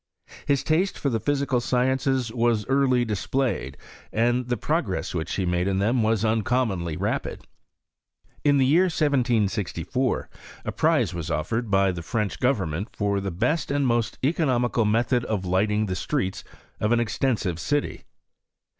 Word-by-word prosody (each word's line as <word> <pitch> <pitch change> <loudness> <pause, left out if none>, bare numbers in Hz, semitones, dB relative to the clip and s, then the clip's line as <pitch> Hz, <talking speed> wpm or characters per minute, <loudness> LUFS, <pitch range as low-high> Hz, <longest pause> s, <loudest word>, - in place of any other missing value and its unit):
^is 140 -1 +2
taste 175 +5 +1
for 140 - -1
the 115 - 0
physical 140 +1 0
sciences 130 0 +1
was 115 -2 +1
early 135 -2 +2
dis 105 -4 -3
)[>layed, 130 - -1 0.4
and 120 +2 +1
the 120 0 -1
progress 150 - -1
which 80 -3 -3
he 95 - -1
made 90 +1 0
in 95 -1 0
them 115 +5 +2
was 110 0 +1
Xincommonly 110 -7 0
rapid. - - -3 1.0
In 145 -1 +4
the 135 - +4
year 165 +8 +4
1764 120 - 0 0.4
a - - -2
prize - - +2
was 85 -2 -5
offered 105 +9 -2
by 95 -1 +3
the 85 -2 -5
French 105 +3 -2
government 100 - 0
for 100 -1 0
the 95 - -2
best 140 - -1
and 140 0 +1
tnost 120 -3 0
economical 125 - +1
method 115 +3 +2
of 100 -4 -2
lighting 105 +4 +1
the 95 -2 -3
streets 95 -1 -2 0.4
of 105 - +1
5U1 120 0 +3
extensive 110 -6 -1
city. 145 +7 -2
115 Hz, 155 wpm, -25 LUFS, 100-130 Hz, 1.0 s, In